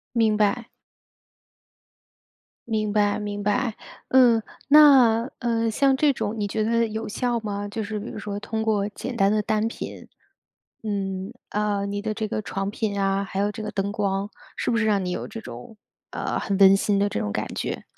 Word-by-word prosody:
明 220 -2 +3
白。 220 +3 +1 2.0
明 215 -2 -1
白 205 0 +2
明 205 -1 -4
白， 225 +2 0 0.3
嗯。 245 -3 +5 0.3
那， 265 -6 +7
呃， 230 -2 0
像 270 +4 +3
这 290 +2 +3
种 225 -4 -3
你 205 - -1
觉 215 +2 -1
得 230 +1 +2
有 220 +1 -4
效 240 +2 -1
吗？ 205 -1 -4
就 220 +1 -4
是 210 0 -4
比 210 - -7
如 - - -8
说 205 -1 -5
通 220 +2 -3
过 210 -2 +1
简 245 +4 -6
单 195 -2 +3
的 215 - +2
单 215 +1 0
品 230 - -7 0.8
嗯， 195 -1 -3 0.2
啊， 205 -1 -1
你 200 0 -3
的 215 0 -2
这 215 0 -3
个 215 - -3
床 195 -1 -3
品 210 -2 -2
啊， 195 0 +1
还 195 0 -5
有 205 +1 +1
这 210 - -7
个 210 0 -4
灯 200 0 -2
光， 200 -1 -1 0.3
是 - - -1
不 230 - +1
是 230 - +1
让 205 -3 +2
你 180 - -2
有 - - -4
这 225 - -7
种 125 - -10 0.3
呃， - - -3
很 195 - -1
温 195 0 +8
馨 200 +1 +1
的 200 +1 +2
这 - - -3
种 105 - -2
感 - - -2
觉？ - - -4
210 Hz, 205 characters per minute, -24 LUFS, 200-225 Hz, 2.0 s, 温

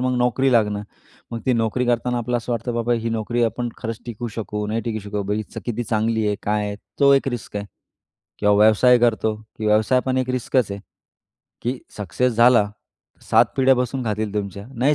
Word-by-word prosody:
मग 130 0 0
नोकरी 125 +2 +2
लागणं. 105 -3 +2 0.5
मग 115 -1 -4
ती 130 - +4
नोकरी 115 +1 0
करताना 120 0 +1
आपल्याला 120 +1 -1
असं 120 +1 -4
वाटतं, 120 +1 -2
बाबा 120 +1 0
ही 115 0 -2
नोकरी 115 +2 -1
आपण 120 +2 -2
खरंच 115 -2 -4
टिकू 120 +1 -5
शकू 105 -1 -3
नाही 110 +1 -1
टिकू 110 -2 -2
शकू. 105 0 -2
बाबा 105 +2 -4
किती 120 0 -2
चांगली 110 0 0
आहे? 105 -1 0
काय 105 0 0
आहे? 100 - -5 0.2
तो 140 0 +7
एक 135 0 +1
रिस्क 120 -4 -5
आहे 100 - -4 0.7
किंवा 105 0 +3
व्यवसाय 120 +3 +6
करतो, 110 -2 +2
की 110 0 -8
व्यवसाय 110 +4 +3
पण 130 0 +1
एक 130 0 -1
रिस्कच 125 -3 0
आहे. 100 - -6 0.8
की 125 +2 -2 0.2
सक्सेस 105 +6 0
झाला 120 -1 +6
तर 105 +1 -21
7 - - +6
पिढ्या 135 0 +5
बसून 125 +1 -2
खातील 105 -1 -2
तुमच्या 100 0 -4
नाही 140 +5 +3
115 Hz, 195 wpm, -22 LUFS, 105-125 Hz, 0.8 s, तो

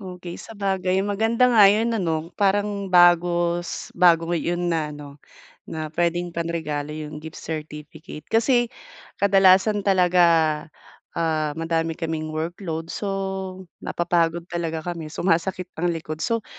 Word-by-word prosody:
Okey, 180 -2 -8
sabagay 190 -3 -1
maganda 225 +5 +2
nga 225 -4 +6
'yun 220 +3 +1
ano. 165 -5 -2
Parang 200 -1 0
bago 175 -1 +4
s - - -6
bago 170 -2 +4
'yun 175 +1 -1
na 155 -3 -1
ano, 145 -1 -10 0.5
na 155 -1 -5
puwedeng 175 +2 -1
panregalo 155 -3 -3
'yong 150 0 -7
gift 160 0 -9
certificate. 155 0 -8
Kasi, 240 +1 +2 0.5
kadalasan 195 +1 +4
talaga, 180 -2 +3 1.0
ah, 155 -2 0
madami 165 0 -1
kaming 160 -2 -3
workload 165 +1 -4
so, 205 - -4 0.7
napapagod 170 -1 0
talaga 165 -2 -3
kami, 170 -3 -5
sumasakit 180 +2 -1
ang 175 - +1
likod. 155 -1 -6
So, 230 +6 -1
175 Hz, 125 wpm, -23 LUFS, 160-190 Hz, 1.0 s, nga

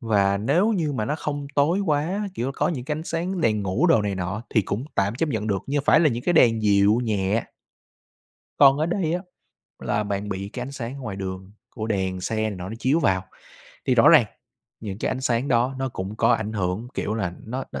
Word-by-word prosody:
và 100 -4 +2
nếu 165 - +2
như 165 -8 0
mà 110 -6 -1
nó 130 - -1
không 145 -2 -4
tối 150 +6 +3
quá, 180 +5 0
kiểu, 135 -4 -2
có - - +1
những 135 -8 -3
cái 150 - -3
ánh - - -5
sáng 175 +3 -2
đèn 110 -7 +1
ngủ 100 - +1
đồ 140 -11 +4
này 100 -1 -1
nọ 95 +4 -3
thì 110 - +3
cũng 105 +7 -3
tạm 100 +2 +1
chấp 160 +6 -1
nhận 110 -6 -2
được, 100 -3 -1
nhưng 145 +1 0
phải - - +5
là 160 - +5
những 120 -2 -3
cái 175 - +1
đèn 115 -9 +4
dịu 100 +1 +4
nhẹ. 105 -1 0 1.1
Còn 140 -1 +7
ở 155 - +1
đây 170 -2 -1
á, 180 - -2 0.6
là 105 0 -1
bạn 100 0 -3
bị 100 0 -4
cái 125 - -4
ánh 135 - -6
sáng 125 -2 -5
ở 140 - -9
ngoài 105 -6 -5
đường, 95 0 -6 0.2
của 110 -1 -4
đèn 95 -3 -1
xe 110 +4 -3
này 110 0 0
nọ 90 -2 -6
nó 110 - -6
chiếu 135 +7 +2
vào, 95 - +1 0.6
thì - - +3
rõ - - +6
ràng - - +7 0.6
những 100 -3 -6
cái - - -1
ánh 130 - -3
sáng 125 +1 0
đó 125 +2 +2
nó 135 0 -1
cũng 100 -3 -6
có - - +2
ảnh 110 -1 -1
hưởng, 100 +3 -2
kiểu 105 - -2
là, 95 -6 -2
nó 125 +4 -4
nó - - -4
115 Hz, 240 wpm, -24 LUFS, 100-145 Hz, 1.1 s, Còn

